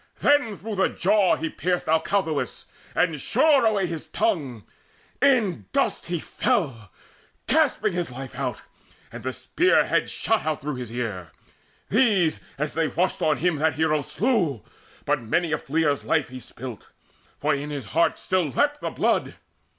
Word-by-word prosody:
Then 270 -9 +2
through 215 -1 -6
the 190 - +3
jaw 195 0 +3
he 165 - -3
pierced 175 +3 -1
Alcathous, 160 0 0 0.3
And - - +1
shore 290 -7 +4
away 205 -3 +1
his 165 -3 -5
tongue: 140 - -1 0.6
in 215 - +2
dust - - 0
he 175 -1 -2
fell 145 - -1 0.5
Gasping 260 - +2
his 175 -3 -2
life 130 +1 -8
out, - - -4 0.5
and - - -8
the 130 - -3
spear 355 - +2
head - - +1
shot 225 -1 0
Out 155 -2 -1
through 145 -1 -4
his 125 -3 -6
ear. 105 -8 -4 0.6
These, 200 -8 +3 0.2
as 150 +1 -2
they 165 0 +1
rushed 175 +7 0
on 155 -1 +2
him, 175 -1 +1
That 155 -1 +1
hero 155 0 +1
slew; 180 - 0 0.4
but 145 -2 +1
many 160 +9 0
a 150 - 0
fleer's 150 -1 0
life 155 -4 +1
He 130 0 -8
spilt, 125 -2 -9 0.5
for 150 +1 +1
in 145 +1 -3
his 140 -5 -5
heart 165 0 +3
still 185 -5 0
leapt 290 - +1
the - - -2
blood. - - 0
160 Hz, 160 wpm, -24 LUFS, 140-205 Hz, 0.6 s, shore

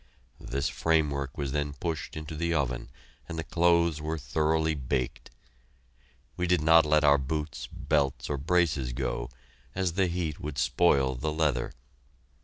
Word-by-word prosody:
This 70 +1 -2
framework 70 -2 0
was 70 -2 -2
then 75 0 -1
pushed 80 0 -4
into 75 +1 -6
the 85 +1 0
oven 65 -5 -1 0.4
and 85 - -5
the 80 - -2
clothes 85 -2 +2
were 80 +1 -2
thoroughly 80 +1 +1
baked. 65 -3 -3 1.1
We 90 - -1
did 90 -3 +3
not 80 0 +6
let 75 +1 +4
our 70 -1 +6
boots, 70 -1 -4
belts, 70 -3 0
or 75 - -2
braces 75 -5 +1
go, - - -3 0.5
as 95 -3 0
the 95 +1 +2
heat 85 -3 -3
would 75 -1 -6
spoil 65 0 +3
the 75 +5 -2
leather. 75 -6 0
75 Hz, 150 wpm, -28 LUFS, 70-80 Hz, 1.1 s, not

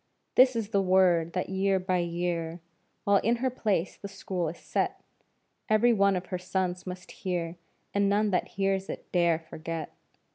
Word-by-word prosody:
This 255 0 +6
is 220 -3 -2
the 200 -2 +2
word 180 -3 +3
that 180 - -2
year 190 0 +2
by 185 -1 0
year, 170 -1 -2 0.4
While 200 0 +4
in 230 +4 +2
her 255 +2 -1
place 205 -7 -1
the 200 - -7
School 190 -4 -3
is 165 - -8
set, - - -2 0.7
Every 225 +3 +5
one 200 -2 +3
of 180 0 -3
her 180 - -1
sons 185 0 -2
must 180 0 -7
hear, 175 -2 -3 0.4
And 200 0 +2
none 205 +1 +2
that 180 - +1
hears 195 0 0
it - - -7
dare 170 -2 +3
forget. 165 0 -6
185 Hz, 175 wpm, -28 LUFS, 175-200 Hz, 0.7 s, This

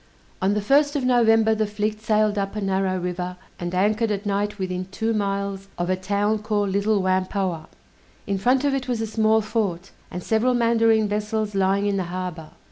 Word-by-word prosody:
On 195 +2 +2
the 210 - 0
first 285 +6 +3
of 275 -3 0
November, 225 -3 +4
the 215 -1 0
fleet 210 +1 -3
sailed 215 -1 +2
up 200 0 -2
a 210 - -3
narrow 190 -1 0
river, 180 0 -4 0.2
and 175 +1 -4
anchored 215 +4 +2
at 205 0 -2
night 205 +1 -1
within 185 -1 -3
two 220 +4 -2
miles 200 -1 -2
of 175 +1 -1
a - - +2
town 205 +3 0
called 210 -1 -1
Little 200 0 +1
Whampoa. 185 -2 -1 0.6
In 200 -1 -1
front 255 +7 +2
of 285 - +2
it 270 -1 -2
was 245 -3 -1
a - - 0
small 220 0 +2
fort, 200 -5 -2 0.2
and 180 - -6
several 235 +3 +2
mandarine 230 -2 +3
vessels 210 +1 -2
lying 195 +1 +1
in 200 -1 +1
the 185 - -1
harbor. 175 -3 -5
205 Hz, 195 wpm, -23 LUFS, 190-220 Hz, 0.6 s, November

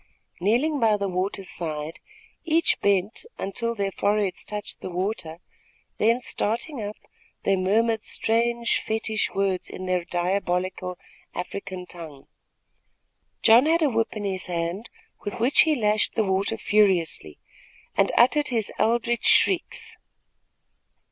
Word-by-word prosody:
Kneeling 245 - +2
by 220 -3 +3
the 200 -1 -2
water's 190 +1 -2
side, 155 -1 -3 0.4
each 335 +1 +2
bent 200 +1 +1
until 230 +4 -3
their 200 -2 -1
foreheads 205 -1 0
touched 210 -1 -6
the - - -5
water, 180 -2 -3 0.6
then, 230 +3 +3
starting 240 +4 -2
up, 205 0 -5 0.5
they 195 - +3
murmured 220 +4 +2
strange 235 +2 0
fetich 220 -1 -2
words 195 -2 0
in 185 - -7
their 180 -1 0
diabolical 180 +1 -1 0.4
African 185 0 -5
tongue. 160 -6 -11 1.2
John 235 +5 +7
had 330 +1 +3
a 290 - +3
whip 225 0 0
in 210 - -4
his 190 -2 -2
hand, 175 +5 -3 0.3
with 205 - -5
which 250 +5 +5
he 315 -1 +3
lashed 215 -3 +1
the 220 - +2
water 190 +1 0
furiously, 180 - +1 0.6
and - - +3
uttered 290 +5 +4
his 225 -4 -1
eldritch 235 +1 +1
shrieks. 375 -3 +3
205 Hz, 130 wpm, -25 LUFS, 185-230 Hz, 1.2 s, John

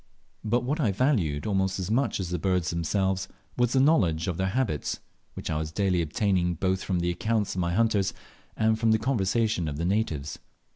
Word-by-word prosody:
But 120 +3 +1
what 145 +6 -1
I 120 -10 +2
valued 95 - +1
almost 95 -2 0
as 95 +1 -3
much 130 +1 +1
as 95 -3 -3
the 90 - -1
birds 90 -1 0
themselves 95 +3 0 0.3
was 120 -1 +1
the 135 - +4
knowledge 95 - +3
of 90 -3 -2
their 95 +1 0
habits, 100 - -1 0.4
which - - -5
I 80 - 0
was 80 0 -4
daily 95 -1 +1
obtaining 90 +2 0
both 95 +2 0
from 90 -3 -1
the 85 0 +1
accounts 110 +1 -1
of 90 - -2
my 85 0 0
hunters, 105 -3 +2 0.5
and 110 0 +2
from 110 -1 +3
the - - +4
conversation 110 -5 0
of 70 -1 -4
the 85 - -2
natives. 85 -8 -1
95 Hz, 200 wpm, -27 LUFS, 85-110 Hz, 0.5 s, the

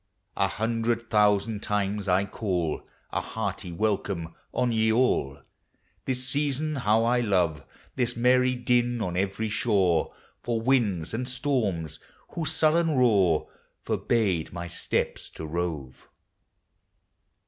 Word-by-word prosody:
THE 100 - -49
SEASONS. 100 0 -48
T9 - - +1
A - - -7
hundred 115 +1 -1
thousand 105 0 +3
times 105 0 -1
I 95 +2 +3
call 90 -6 -2 0.3
A - - -1
hearty 100 -4 -4
welcome 95 -3 -1 0.2
on 125 -1 0
ye 110 -1 +2
all! 110 - +1 0.7
This 130 0 -2
season 145 +2 0
how 110 -3 +3
1 120 -1 +1
love 85 -7 +1 0.2
— - - -29
This 125 -1 0
merry 125 +1 +3
din 120 -1 +1
on 90 -5 -2
every 95 +4 -1
shore 95 -7 +2 0.2
— - - -37
For 120 -2 -1
winds 110 -9 +1
and 125 +3 -2
storms, 110 - -1 0.3
whose 165 -2 -1
sullen 160 0 +3
roar 100 -11 +3 0.4
Forbade 100 -9 0
my 85 0 -5
steps 85 - -2
to 80 - -6
rove. 80 -5 -4
110 Hz, 135 wpm, -27 LUFS, 90-125 Hz, 0.7 s, thousand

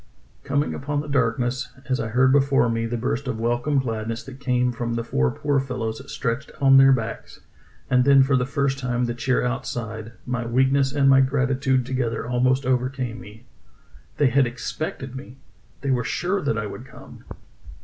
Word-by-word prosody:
Coming 145 +1 0
upon 145 +1 -2
the 150 - -8
darkness, 125 -1 0 0.2
as 130 -1 0
I 115 - -2
heard 130 +4 +3
before 135 -2 +3
me 115 0 -1
the 120 +1 -3
burst 125 +3 -2
of 115 -3 -3
welcome 120 +5 0
gladness 115 -3 -2
that 135 -1 -11
came 125 -2 +1
from 115 -1 -3
the 115 - -2
four 65 - +1
poor 145 - 0
fellows 125 -3 -4
stretched 120 +4 -3
on 135 -1 +6
their 135 0 +7
backs, 115 -3 -3 0.5
and 125 0 +3
then 140 0 +6
for 140 +1 +2
the 125 0 +1
first 140 -1 -1
time 125 -1 -1
the 120 - -2
cheer 125 +1 0
outside, 115 -3 -4
my 125 -1 -2
weakness 135 +3 +2
and 140 -1 +2
my 135 0 +6
gratitude 135 -1 +1
together 125 -3 -2
almost 130 +2 +1
overcame 125 -2 -1
me. 110 +1 -14 0.7
They 145 -3 +4
had 135 0 +3
expected 130 +1 -5
me! 130 -1 -9 0.4
They 140 - -1
were 125 -2 +1
sure 185 - -1
that 140 -5 -1
I 105 - -2
would 120 +5 -8
come - - -14
130 Hz, 180 wpm, -23 LUFS, 120-135 Hz, 0.7 s, their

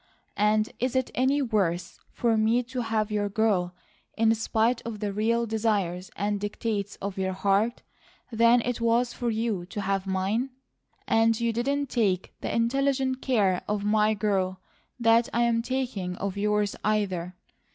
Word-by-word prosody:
And 215 +1 +2
is 255 +1 -1
it 260 -1 0
any 270 +3 +2
worse 195 -8 -1
for 235 -2 +1
me 220 +3 +2
to 250 +1 -4
have 220 -2 -1
your 205 -1 0
girl 195 -4 +1 0.4
in 225 0 +4
spite 225 +2 +1
of 225 -2 -6
the 205 -1 -2
real 230 +3 +1
desires 205 -5 -1
and 205 0 -1
dictates 205 0 -3
of 195 -1 -5
your 190 0 -1
heart, 200 +5 +1 0.5
than 230 +1 +5
it 245 0 -3
was 235 +1 +2
for 240 - -2
you 220 -4 -1
to 205 - -5
have 195 0 -1
mine? 195 +7 0 0.6
And 225 0 +3
you 235 -1 0
didn't 280 +4 -1
take 195 -6 0
the - - -3
intelligent 265 +2 +1
care 200 -8 +2
of 210 -1 -1
my 215 +1 +3
girl 190 -2 0 0.4
that 230 0 +4
I'm 235 0 +2
taking 240 -8 -3
of 195 +1 -4
yours, 210 0 0
either. 190 -4 -1
220 Hz, 155 wpm, -27 LUFS, 200-235 Hz, 0.6 s, than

